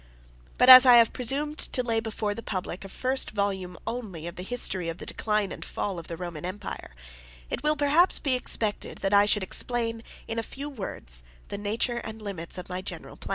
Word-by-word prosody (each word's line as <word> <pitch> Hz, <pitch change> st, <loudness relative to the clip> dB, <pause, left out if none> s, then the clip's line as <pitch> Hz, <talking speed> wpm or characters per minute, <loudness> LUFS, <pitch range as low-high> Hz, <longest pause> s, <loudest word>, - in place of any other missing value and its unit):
But 250 Hz, -, +4 dB
as 255 Hz, 0 st, +12 dB
I 250 Hz, -2 st, +8 dB
have 230 Hz, -2 st, +5 dB
presumed 285 Hz, +5 st, -1 dB
to 250 Hz, -, 0 dB
lay 230 Hz, -2 st, 0 dB
before 220 Hz, -2 st, -3 dB
the 230 Hz, -, -7 dB
public 185 Hz, -3 st, -5 dB
a 195 Hz, -, -9 dB
first 260 Hz, +6 st, -1 dB
volume 190 Hz, -4 st, -2 dB
only 215 Hz, -9 st, -5 dB
1 170 Hz, -, -5 dB
of 170 Hz, -, -12 dB
the -, -, -7 dB
History 190 Hz, -5 st, 0 dB
of 165 Hz, -, -5 dB
the -, -, -9 dB
Decline 210 Hz, -2 st, -1 dB
and -, -, -7 dB
Fall 195 Hz, -4 st, -4 dB
of 165 Hz, -, -11 dB
the 165 Hz, -, -6 dB
Roman 170 Hz, -4 st, -7 dB
Empire, 185 Hz, -, -7 dB, 0.6 s
it -, -, -3 dB
will, 300 Hz, 0 st, +2 dB
perhaps, 300 Hz, +5 st, +4 dB
be 275 Hz, -3 st, -1 dB
expected 225 Hz, -4 st, -1 dB
that 195 Hz, -, +1 dB
I 200 Hz, 0 st, +6 dB
should 210 Hz, -1 st, +2 dB
explain, 230 Hz, +3 st, +1 dB, 0.3 s
in 230 Hz, -, -3 dB
a -, -, 0 dB
few 280 Hz, +5 st, -7 dB
words, -, -, -5 dB, 0.3 s
the -, -, -4 dB
nature 225 Hz, +4 st, -1 dB
and 220 Hz, -1 st, -8 dB
limits 190 Hz, -5 st, -5 dB
of 180 Hz, -, -7 dB
my 180 Hz, 0 st, -4 dB
general -, -, -7 dB
plan. -, -, -10 dB
215 Hz, 215 wpm, -27 LUFS, 185-245 Hz, 0.6 s, as